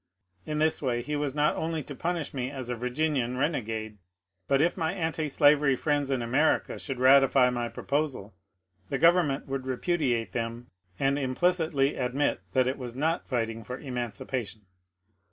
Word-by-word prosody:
In 150 0 -2
this 155 +1 +1
way 120 -4 -1
he 150 +3 -3
was 145 -2 -2
not 150 0 +2
only 160 -1 -2
to 145 - -8
punish 170 +2 -3
me 130 -2 -2
as 130 -3 -5
a - - -1
Virginian 125 0 -1
rene 150 +1 +1
gade, 110 -1 -6 0.5
but 135 - +3
if 170 +4 +2
my 165 0 -1
antislavery 150 -4 +3
friends 145 0 0
in 130 -3 0
America 135 +7 +1
should 135 -3 -5
ratify 130 -1 +6
my 120 -1 -2
proposal, 140 -9 -2 0.6
the - - -1
government 165 -2 +3
would 135 -1 -4
repudiate 130 -4 0
them 115 +1 -4 0.3
and 140 +1 +1
impli^ 140 +7 +2 0.2
citly 135 0 +1
admit 130 +4 0
that 130 -1 +3
it 130 +2 -2
was 125 -2 -6
not 160 +5 -1
fighting 115 -2 -2
for 125 +4 -6
emancipation. 120 -4 -5
135 Hz, 165 wpm, -28 LUFS, 125-150 Hz, 0.6 s, ratify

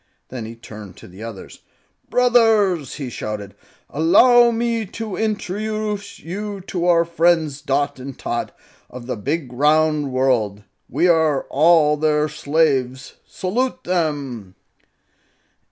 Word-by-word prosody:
Then 125 -3 -6
he 115 +1 -8
turned 105 -5 -11
to - - -13
the 95 +3 -13
others. 115 -4 -9 0.5
"Brothers!" 220 - +3
he 135 -4 -6
shouted. 105 -3 -6 0.3
"Allow 235 - +5
me 230 -1 -1
to 215 +1 -6
introduce 215 0 -3
you 200 +4 -6
to 180 -1 -3
our 170 -1 +4
friends 165 -4 +1
Dot 140 0 -1
and 135 0 -8
Tot, 120 - -3 0.4
of 125 -1 -10
the 125 0 -3
Big 135 +4 -3
Round 150 +1 +2
World. 120 -6 0 0.3
We 160 +8 +2
are 160 -5 +3
all 150 0 +4
their 150 0 +1
slaves. 140 -4 -1
Salute 245 +8 -2
them!" 145 - -2
155 Hz, 120 wpm, -20 LUFS, 130-185 Hz, 0.5 s, Allow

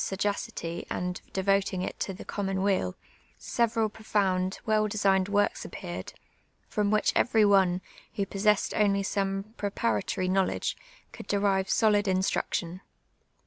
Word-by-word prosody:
sagacity 195 -4 -3
and 180 0 -3
devotinjj^ 195 -1 +1
it - - -6
to - - -2
the 190 - -9
'onimon 195 -1 -2
weal, 190 - +1 0.4
several 230 -1 +1
profound, 195 -4 0
well 215 -1 +2
desi^ied 195 -2 +2
works 205 0 +1
appeared, - - -7 0.6
Voin 210 -2 +1
which 215 0 +2
every 220 -3 +4
one, 190 -3 +4 0.3
who 200 -3 0
j)ossess(>d 205 +1 +1
only 200 -1 +2
some 195 +1 -2
j)repanitory 185 - -1
vnowle(l<;e, 190 0 0 0.4
could - - -10
derive 195 -1 +1
solid 210 -2 +3
instruction. 185 -1 -1
195 Hz, 125 wpm, -28 LUFS, 190-205 Hz, 0.6 s, every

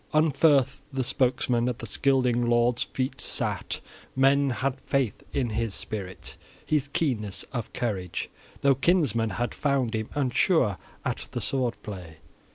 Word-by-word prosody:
Unferth 145 -3 +4
the 135 -1 -1
spokesman 125 -1 +1
at 120 - -3
the - - -7
Scylding 125 +1 +2
lord's 120 0 +3
feet 130 0 -2
sat: - - -1 0.3
men 135 +1 +4
had 130 +1 -1
faith 135 -6 0
in 125 -4 0
his 110 -1 -1
spirit, 95 -4 -5 0.3
his 150 -2 +1
keenness 120 - -1
of 120 -4 -3
courage, 95 -7 -2 0.3
though 140 0 +5
kinsmen 135 - +2
had 120 +4 -2
found 135 -5 0
him 110 -1 -2
unsure 130 - +2 0.3
at - - -2
the - - -1
sword 130 -3 0
play. 90 -6 -8
125 Hz, 140 wpm, -27 LUFS, 115-135 Hz, 0.3 s, though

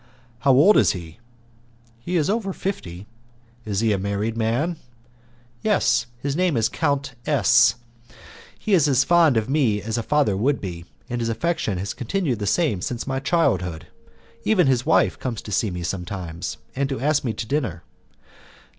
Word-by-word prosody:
"How 135 +4 +3
old 155 +11 +6
is - - +4
he?" 85 +1 -9 0.8
"He 175 +9 -2
is 155 -2 +1
over 200 -2 -1
fifty." 95 - -5 0.6
"Is 105 -1 -1
he 110 -2 +2
a 100 - -1
married 100 +3 -2
man?" 120 +10 0 0.8
"Yes, 210 - +2
his 140 +3 -3
name 175 -5 +1
is 110 - +2
Count 140 -4 -1
S. 125 -5 +4 0.8
He 215 - -2
is 160 -6 +5
as 135 -2 +3
fond 165 -5 +4
of 110 0 0
me 130 -7 +1
as 110 +3 -3
a - - -1
father 140 -4 +1
would 135 +8 +1
be, 85 -3 -6 0.2
and 120 0 -3
his 115 - -1
affection 115 - -1
has 95 +2 -3
continued 130 - -2
the 105 - -3
same 115 - +1
since 120 +4 -3
my 135 -1 -2
childhood. 90 - 0 0.5
Even 190 -6 +3
his 130 -3 +1
wife - - +3
comes 120 -4 -4
to 105 - -8
see 105 +1 +1
me 90 -1 -5
sometimes, 90 -2 -5 0.2
and 135 +1 -1
to 135 - -3
ask 145 +2 +1
me 120 - -1
to 110 - -5
dinner. 110 - -2
120 Hz, 170 wpm, -23 LUFS, 100-150 Hz, 0.8 s, old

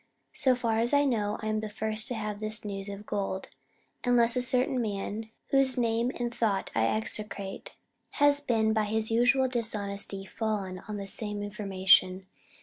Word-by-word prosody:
So 260 -2 +3
far 230 -2 0
as 240 +5 +4
I 285 0 +4
know, 210 -6 0
I - - -2
am 215 0 0
the 215 0 -5
First 220 +1 -3
to 245 - -3
have 210 -2 -4
this 215 +1 -3
news 195 -1 -5
of 200 +1 -8
Gold, 195 -2 -3 0.5
unless 240 -1 +3
a 250 - +1
certain 250 0 +2
man 215 +1 -4 0.2
whose 270 -1 +3
name 235 0 +1
and 240 -1 -3
thought 215 -5 -1
I 110 0 +2
execrate 195 - -2 0.4
has 290 0 +3
by 220 -4 +1
his 220 +1 -1
Usual 245 +3 +3
dishonesty 205 -5 0
fallen 200 -3 -3
on 210 -1 -4
the 200 - -5
same 205 +1 -3
information. 190 -2 +2
215 Hz, 165 wpm, -29 LUFS, 200-240 Hz, 0.5 s, as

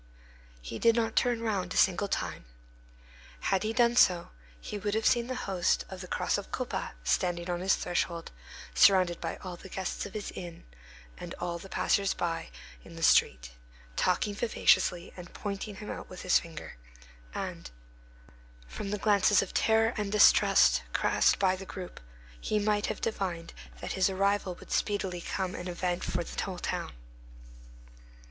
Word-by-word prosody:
He 115 - -6
did 230 -1 +4
not 225 -1 0
turn 240 -2 +2
round 195 -5 -1
a - - -2
single 195 +2 +3
time. 125 - -3 0.9
Had 195 -1 +1
he 215 - -1
done 235 0 +3
so, 180 -7 +4 0.3
he 205 - -6
would 205 +1 -1
have 220 - -1
seen 240 -1 +3
the 255 - -3
host 190 -3 +1
of 190 -1 -8
the 180 - -8
Cross - - 0
of - - -10
Colbas - - -3
standing 175 - 0
on 175 - -2
his 190 +2 +3
threshold, 175 -1 -2 0.4
surrounded 185 -3 +5
by 165 - -3
all 180 -2 -6
the 190 - -12
guests 190 +2 -3
of 200 - -14
his 210 - -4
inn, 175 -2 -9 0.5
and - - -7
all 175 -1 -4
the 195 - -11
passers 195 0 +1
by 165 -1 -2 0.3
in 170 - -13
the 165 - -6
street, - - +4 0.4
talking 195 - +1
vivaciously, 195 -5 +2
and 175 -1 -11
pointing 205 0 -5
him 210 +2 -7
out - - -7
with 185 - -9
his 180 - +4
finger; 165 - -10 0.6
and, - - -5 1.0
from 130 - -6
the 210 - -1
glances 205 -1 +4
of 195 - -9
terror 225 +1 +3
and 205 -2 -2
distrust 210 - +6
cast - - +3
by 190 -1 +2
the 190 - -8
group, 185 -1 -8 0.4
he 215 - -1
might 210 0 +1
have - - -4
divined 185 -6 -3 0.3
that - - -4
his 190 0 +2
arrival 195 -1 0
would - - -14
speedily 195 -4 -1
become 185 +1 -3
an 175 - -6
event 180 0 -2
for 175 -1 -1
the - - -4
whole 185 -2 -4
town. - - -3
190 Hz, 170 wpm, -30 LUFS, 175-205 Hz, 1.0 s, distrust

